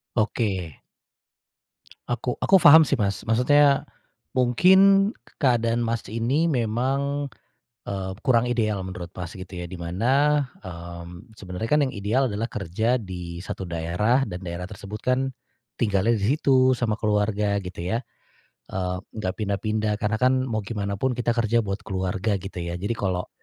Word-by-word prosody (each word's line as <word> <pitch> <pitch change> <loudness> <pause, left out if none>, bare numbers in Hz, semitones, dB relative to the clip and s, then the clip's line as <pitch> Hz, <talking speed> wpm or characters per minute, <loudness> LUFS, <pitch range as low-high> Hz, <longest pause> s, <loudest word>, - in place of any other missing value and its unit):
Oke. 100 - -1 1.3
Aku 120 +1 -2
aku 195 -2 +4
paham 155 +1 +9
sih - - -1
Mas 100 -1 -1
maksudnya, 140 +5 +4 0.6
mungkin 190 - +5 0.2
k - - -20
keadaan 120 -3 +2
Mas 115 0 -2
ini 115 +10 0
memang, 135 +2 -1 0.6
eee, 95 -1 -3
kurang 125 -4 +3
ideal 110 -5 0
menurut 90 -2 -7
Mas 85 -2 -5
gitu 95 -1 -9
ya 90 - -4
di 90 - -10
mana, 130 +12 +1 0.2
mmm, 85 +3 -9
sebenarnya 95 +1 -6
kan 150 0 +4
yang 140 - +1
ideal 115 +6 +1
adalah 105 +3 -2
kerja 110 +5 -1
di 90 -3 -7
1 95 -1 -5
daerah 90 +10 +1
dan 90 - -5
daerah 85 +2 -5
tersebut 105 +2 -8
kan, 130 +1 0 0.5
tinggalnya 105 +1 +2
di 110 +8 +1
situ 130 -4 +4
sama 110 -3 0
keluarga 105 -1 0
gitu 90 -3 -6
ya, 115 +4 -1 0.7
eee, 90 -1 -2 0.2
gak 95 0 -2
pindah-pindah 105 +1 -1
karena 105 +1 0
kan 130 +2 +2
mau 110 -2 -2
gimana 100 -2 -3
pun 130 +5 0
kita 120 0 -1
kerja 115 0 +2
buat 100 -2 -4
keluarga 95 +1 -1
gitu 95 -1 -7
ya 85 +1 -4
jadi 110 +3 -2
kalau, 95 -3 -2
110 Hz, 150 wpm, -24 LUFS, 95-125 Hz, 1.3 s, paham